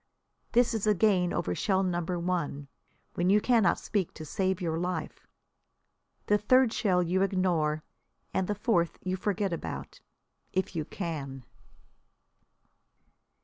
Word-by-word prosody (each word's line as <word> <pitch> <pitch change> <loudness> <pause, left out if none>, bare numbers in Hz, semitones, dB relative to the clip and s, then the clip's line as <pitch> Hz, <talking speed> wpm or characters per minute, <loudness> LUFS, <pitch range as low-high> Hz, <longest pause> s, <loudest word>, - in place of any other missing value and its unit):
This 245 0 +4
is 220 -1 -1
a 210 - +4
gain 185 -3 +3
over 90 - -1
shell 190 - +1
number 175 -1 -1
one, 170 -5 -2 0.5
when 175 +1 +1
you 205 +2 +6
cannot 220 -5 +3
speak 200 -5 -2
to 155 - -7
save 190 +3 -1
your 165 -3 -1
life. 175 -3 -4 1.0
The 210 0 +3
third 255 +2 +4
shell 180 -5 +2
you 180 +2 +1
ignore, 175 -6 +1 0.5
and 190 -1 0
the 210 - -1
fourth 180 -6 +1
you 185 0 -1
forget 195 -1 -1
about 170 - -6 0.5
if 185 -1 -1
you 155 -2 -1
can. 140 - -5
185 Hz, 135 wpm, -29 LUFS, 170-205 Hz, 1.0 s, you